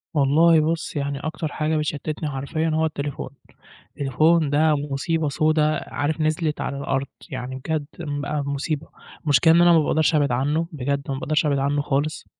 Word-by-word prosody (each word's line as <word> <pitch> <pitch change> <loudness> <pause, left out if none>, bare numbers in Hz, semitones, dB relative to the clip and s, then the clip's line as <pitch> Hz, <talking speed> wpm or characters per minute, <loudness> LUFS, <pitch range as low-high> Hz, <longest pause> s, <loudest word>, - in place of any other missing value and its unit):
والله 155 +4 +5
بُص 160 +1 -2
يعني 140 -1 -2
أكتر 155 +1 -4
حاجة 155 +1 -1
بتشتتني 150 +1 -3
حرفيًا 145 +4 -2
هو 160 +1 +2
التليفون، 145 -3 -4 0.6
التليفون 155 +3 +2
ده 155 +1 +3
مصيبة 145 +2 -1
سودا 155 0 +1
عارف 150 +2 -1
نزلت 155 0 0
على 140 - -3
الأرض، 140 -1 -2 0.2
يعني 130 -1 -5
بجد 150 +3 -3
بقى 145 -2 -3
مصيبة، 140 +2 -3 0.4
المشكلة 145 +2 +5
إن 170 - +5
أنا 175 0 +6
ما 165 - +6
باقدرش 155 +1 +2
أبعد 145 -3 +2
عنه 145 +6 0
بجد، 140 -1 -2
ما - - -1
باقدرش 155 +3 0
أبعد 140 -2 +1
عنه 140 +1 +1
خالص 145 +2 -2
150 Hz, 165 wpm, -23 LUFS, 140-155 Hz, 0.6 s, أنا